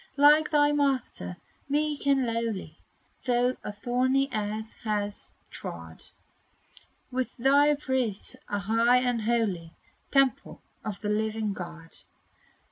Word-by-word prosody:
Like 300 +2 +6
thy 295 -1 +4
Master, 265 - -1 0.3
meek 295 0 0
and 270 -2 +4
lowly, 225 -8 -3 0.5
Thou 245 0 +2
a - - -4
thorny 255 +5 +1
earth 215 0 -3
hast 205 -2 -3 0.2
trod; 80 -1 -8 1.1
With 255 +1 -3
thy 285 +4 +5
breast 260 -7 -1
a 205 - 0
high 230 +5 +3
and 245 -2 0
holy 210 -8 -1 0.3
Temple 275 -4 +1 0.2
of 205 -2 -5
the 210 - -2
living 215 0 0
God. 170 -3 -9
235 Hz, 115 wpm, -28 LUFS, 205-270 Hz, 1.1 s, Like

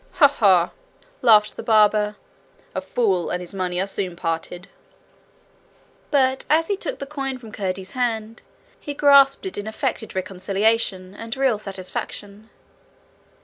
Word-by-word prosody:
'Ha! 290 - +7
ha!' 190 -10 +3 0.5
laughed 215 -4 +5
the - - -4
barber. 210 -2 +3 0.6
'A - - -2
fool 195 - 0
and 180 - -2
his 180 +1 -9
money 180 -2 -2
are 190 - +1
soon 195 -2 -4
parted.' 170 +2 -4 1.4
But 265 -2 +2
as 325 +3 +3
he 405 - +2
took - - -5
the - - -6
coin 275 -2 -4
from 230 -4 -12
Curdie's 190 -2 -4
hand 230 -3 -2 0.4
he 290 - -6
grasped 280 +2 +5
it 375 - -4
in 205 - -6
affected 220 -1 -3
reconciliation 190 +1 0
and 230 +4 -6
real 265 -6 +2
satisfaction. 200 +2 -6
215 Hz, 140 wpm, -22 LUFS, 190-260 Hz, 1.4 s, Ha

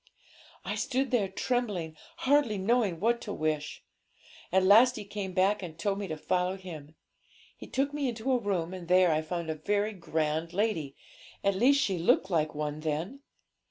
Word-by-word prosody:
'I - - -2
stood 270 0 -1
there 225 -6 +2
trembling, 190 -6 -2 0.3
hardly 270 -6 +3
knowing 200 -3 +1
what 235 +3 +1
to 205 - -6
wish. 155 -3 -2 0.7
At 190 +1 +3
last 225 +6 +6
he 210 - -6
came 200 -1 -5
back, 195 +3 +2
and 165 -4 -8
told 195 +3 -1
me 200 - -4
to 155 -2 -4
follow 180 +4 0
him. 160 -5 -10 0.6
He - - -11
took 275 +2 -1
me 285 -3 -1
into 235 +3 -2
a 255 - +3
room, 190 -5 -2
and 180 -2 -8
there 180 -1 +5
I 155 0 +1
found 165 0 -3
a - - -1
very 205 +7 -1
grand 160 -2 -2
lady 180 -9 -1 0.5
at 200 - +3
least 255 +8 +4
she 190 -3 -1
looked 185 +3 +2
like 155 -3 0
one 150 0 -3
then. 160 - -3
190 Hz, 180 wpm, -29 LUFS, 160-220 Hz, 0.7 s, last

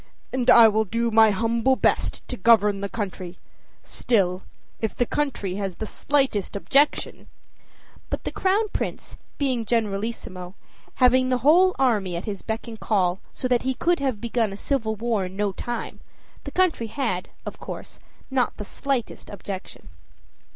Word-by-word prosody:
"And 255 -1 0
I 230 -1 +9
will 220 0 +2
do 230 +3 -1
my 220 0 +6
humble 230 +5 +2
best - - 0
to 250 - -4
govern 210 -2 +4
the 200 - -3
country. 185 -5 -5 0.5
Still, 190 -5 0 0.4
if 220 - -2
the 245 - +1
country 235 -10 -2
has 195 -3 -3
the 220 - -5
slightest 265 -6 0
objection 275 +8 +1 0.4
" - - -29
But - - -3
the - - -3
Crown 400 +3 +1
Prince - - -4 0.2
being 260 -5 0
generalissimo, 200 -4 -3 0.4
having 255 0 +4
the 255 - +2
whole 365 +5 +6
army 210 -9 +1
at 170 - -4
his 200 -3 -5
beck 225 +1 -4
and 225 -2 -8
call, 185 -3 +1
so 255 - -3
that 245 -1 +2
he 260 0 -1
could 345 +3 +1
have 265 -6 -1
begun 230 -2 0
a 195 - -7
civil 220 -3 -1
war 220 -3 -1
in 180 +1 -8
no 205 0 0
time, 240 +4 -5 0.5
the - - -5
country 360 -11 +1
had, 220 -7 -2 0.2
of - - -7
course, - - -8 0.3
not 255 -2 0
the 210 - -6
slightest 270 0 -3
objection. 195 -1 -8
225 Hz, 165 wpm, -24 LUFS, 200-255 Hz, 0.5 s, I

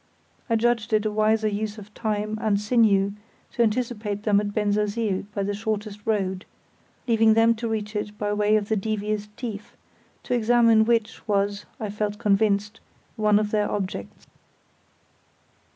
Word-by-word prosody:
I 230 - +3
judged 230 -1 +1
it 215 0 +2
a 215 - 0
wiser 215 +1 +2
use 210 +1 -3
of 210 0 -12
time 215 -1 -2
and 205 -2 +1
sinew 210 -3 +3 0.4
to - - -1
anticipate 215 -3 -1
them 205 -2 +3
at 205 -1 -3
Bensersiel 210 -1 0
by 200 -1 -2
the 205 +1 -1
shortest 210 0 -3
road, 190 -4 0 0.6
leaving 225 -2 +4
them 225 +1 +5
to 230 +1 -3
reach 215 -1 -3
it 210 0 -4
by 205 0 -1
way 210 +1 +2
of 210 -1 0
the 220 - +2
devious 210 0 -2
Tief, 215 -5 -7 0.5
to - - -2
examine 230 -1 +4
which 230 -1 0
was, 200 0 0
I 215 -2 -4
felt 210 0 -2
convinced, 210 -1 +1 0.4
one 210 -1 +3
of 210 0 0
their 210 -1 +1
objects. 190 - -5
210 Hz, 155 wpm, -24 LUFS, 205-220 Hz, 0.6 s, them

